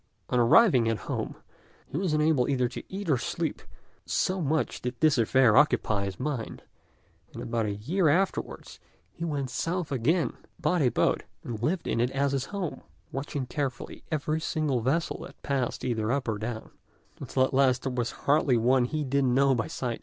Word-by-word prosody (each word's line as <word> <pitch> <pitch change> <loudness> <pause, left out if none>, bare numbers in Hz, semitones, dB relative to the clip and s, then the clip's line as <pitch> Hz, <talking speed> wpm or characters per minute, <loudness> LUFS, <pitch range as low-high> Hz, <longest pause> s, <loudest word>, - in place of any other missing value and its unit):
On 125 - +2
arriving 125 - +5
at 115 - 0
home, - - -3 0.5
he - - -11
was 180 +1 0
unable 150 -4 +2
either 125 -3 +2
to 125 - -7
eat 195 0 -5
or 145 -5 +3
to - - -5
sleep, - - -2 0.4
so 185 0 0
much 155 +1 -1
did 125 0 -4
this 155 -5 +4
affair 115 0 +4
occupy 110 -8 +3
his 95 -2 -6
mind; 135 -7 -4 0.7
and - - -7
about 115 -2 -1
a 100 - -2
year 160 - +1
afterwards 185 +6 -1 0.3
he 165 - -8
went 140 -6 -2
south 170 +2 -2
again, 150 +7 +1 0.3
bought 180 -2 +1
a 130 - +4
boat, - - +1 0.2
and 115 -3 -5
lived 165 +7 0
in 115 - 0
it 125 - +2
as 135 +1 0
his 135 -2 -1
home, 195 -6 -4 0.3
watching 135 0 -3
carefully 135 -1 -4
every 155 +1 -1
single 150 -6 0
vessel 145 +8 0
that - - -11
passed 135 -4 -1
either 115 -2 0
up 140 -1 -1
or 110 -2 -1
down, 110 +1 -5 0.5
until 130 - 0
at 130 - 0
last 130 -1 +3
there 135 - -1
was 120 -2 -1 0.2
hardly 140 -3 +4
one 125 +2 +3
he 155 +4 -2
didn't 135 -2 +1
know 135 0 +4
by 115 -3 -1
sight. 120 -3 -3
135 Hz, 190 wpm, -28 LUFS, 120-155 Hz, 0.7 s, arriving